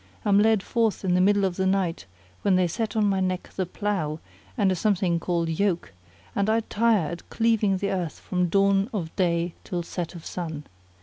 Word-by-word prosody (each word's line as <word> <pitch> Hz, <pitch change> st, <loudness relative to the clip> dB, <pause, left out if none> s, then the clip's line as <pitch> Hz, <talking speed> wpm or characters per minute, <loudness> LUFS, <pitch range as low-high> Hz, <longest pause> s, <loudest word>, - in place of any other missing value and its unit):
am 200 Hz, -1 st, +5 dB
led 215 Hz, -2 st, +3 dB
forth 225 Hz, -4 st, 0 dB
in 180 Hz, -, +2 dB
the 180 Hz, -, +4 dB
middle 200 Hz, +1 st, +4 dB
of 185 Hz, -2 st, -2 dB
the 190 Hz, -, +1 dB
night, 185 Hz, -, 0 dB, 0.3 s
when 195 Hz, -2 st, +3 dB
they 185 Hz, 0 st, +3 dB
set 215 Hz, +5 st, -2 dB
on 215 Hz, -1 st, +3 dB
my 195 Hz, -1 st, +2 dB
neck 185 Hz, -1 st, -2 dB
the 185 Hz, -2 st, -1 dB
plough 175 Hz, -6 st, -2 dB, 0.4 s
and 200 Hz, -4 st, +3 dB
a -, -, +1 dB
something 180 Hz, -2 st, +1 dB
called 170 Hz, -1 st, -1 dB
Yoke; 170 Hz, -, -1 dB, 0.4 s
and 200 Hz, +1 st, +1 dB
I 225 Hz, +1 st, +3 dB
tire 220 Hz, -6 st, +1 dB
at 170 Hz, -, -8 dB
cleaving 225 Hz, -4 st, +2 dB
the 200 Hz, +1 st, -1 dB
earth 175 Hz, -5 st, -2 dB
from 180 Hz, -1 st, -1 dB
dawn 195 Hz, +3 st, +3 dB
of 165 Hz, -5 st, -4 dB
day 170 Hz, -2 st, +1 dB
till 175 Hz, -2 st, -3 dB
set 175 Hz, +1 st, -5 dB
of 165 Hz, -, -10 dB
sun. 160 Hz, -4 st, -5 dB
190 Hz, 200 wpm, -25 LUFS, 175-205 Hz, 0.4 s, am